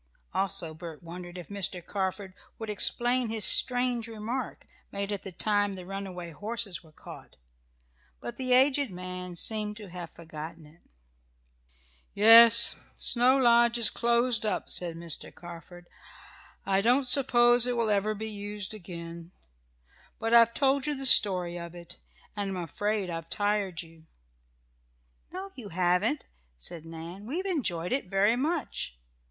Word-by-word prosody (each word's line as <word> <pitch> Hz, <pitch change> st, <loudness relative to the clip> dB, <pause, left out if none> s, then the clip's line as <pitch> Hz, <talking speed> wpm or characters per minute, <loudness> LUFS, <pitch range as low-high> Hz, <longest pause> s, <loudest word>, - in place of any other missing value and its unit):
Also 175 Hz, -4 st, -2 dB
Bert 165 Hz, 0 st, -10 dB
wondered 175 Hz, +1 st, -9 dB
if 175 Hz, -, -10 dB
Mr. 190 Hz, -3 st, -4 dB
Carford 190 Hz, -1 st, -4 dB, 0.2 s
would 220 Hz, -1 st, -5 dB
explain 240 Hz, +3 st, +1 dB
his 220 Hz, -1 st, -1 dB
strange 245 Hz, -2 st, +3 dB
remark, 230 Hz, +3 st, -6 dB, 0.3 s
made 200 Hz, +1 st, -4 dB
at 205 Hz, -, -4 dB
the 195 Hz, -, -9 dB
time 205 Hz, +1 st, -1 dB
the 185 Hz, -1 st, -10 dB
runaway 185 Hz, -3 st, -7 dB
horses 205 Hz, +1 st, -4 dB
were 160 Hz, -, -19 dB
caught. -, -, -13 dB, 0.8 s
But 120 Hz, -, -8 dB
the 255 Hz, -1 st, -1 dB
aged 270 Hz, +1 st, +3 dB
man 180 Hz, -1 st, -7 dB
seemed 210 Hz, +3 st, -2 dB
to 210 Hz, -3 st, -10 dB
have 175 Hz, -2 st, -8 dB
forgotten 160 Hz, 0 st, -10 dB
it. 155 Hz, +3 st, -20 dB, 1.3 s
"Yes, 230 Hz, +2 st, +9 dB
Snow 250 Hz, +2 st, +3 dB
Lodge 235 Hz, -2 st, +4 dB
is 230 Hz, -3 st, +3 dB
closed 235 Hz, -1 st, +1 dB
up," 215 Hz, -, -3 dB
said 170 Hz, -2 st, -3 dB
Mr. 165 Hz, -2 st, -1 dB
Carford. 175 Hz, +1 st, -12 dB, 0.8 s
"I 195 Hz, 0 st, +1 dB
don't 250 Hz, +5 st, +2 dB
suppose 245 Hz, -2 st, +4 dB
it 245 Hz, -1 st, -1 dB
will 225 Hz, -2 st, 0 dB
ever 210 Hz, +1 st, 0 dB
be 220 Hz, +2 st, -6 dB
used 205 Hz, -1 st, -6 dB
again. 170 Hz, -3 st, -10 dB, 0.9 s
But 225 Hz, +1 st, -2 dB
I've 230 Hz, -1 st, +5 dB
told 275 Hz, 0 st, +1 dB
you 295 Hz, -, -1 dB
the 270 Hz, 0 st, -5 dB
story 180 Hz, -7 st, +5 dB
of 170 Hz, 0 st, -9 dB
it, 170 Hz, -1 st, -12 dB, 0.4 s
and 200 Hz, -2 st, -4 dB
I'm 180 Hz, -, -4 dB
afraid 205 Hz, +3 st, -3 dB
I've 165 Hz, 0 st, -7 dB
tired 205 Hz, -4 st, -2 dB
you." 165 Hz, -1 st, -19 dB, 1.2 s
"No 380 Hz, +2 st, -7 dB
you 225 Hz, -6 st, -10 dB
haven't," 180 Hz, -2 st, 0 dB, 0.3 s
said 165 Hz, -, -8 dB
Nan. 165 Hz, +5 st, -10 dB
"We 330 Hz, +9 st, -3 dB
enjoyed 205 Hz, -, -2 dB
it 265 Hz, -5 st, -2 dB
very 200 Hz, +4 st, +2 dB
much." 275 Hz, -, -3 dB
205 Hz, 145 wpm, -28 LUFS, 175-235 Hz, 1.3 s, Yes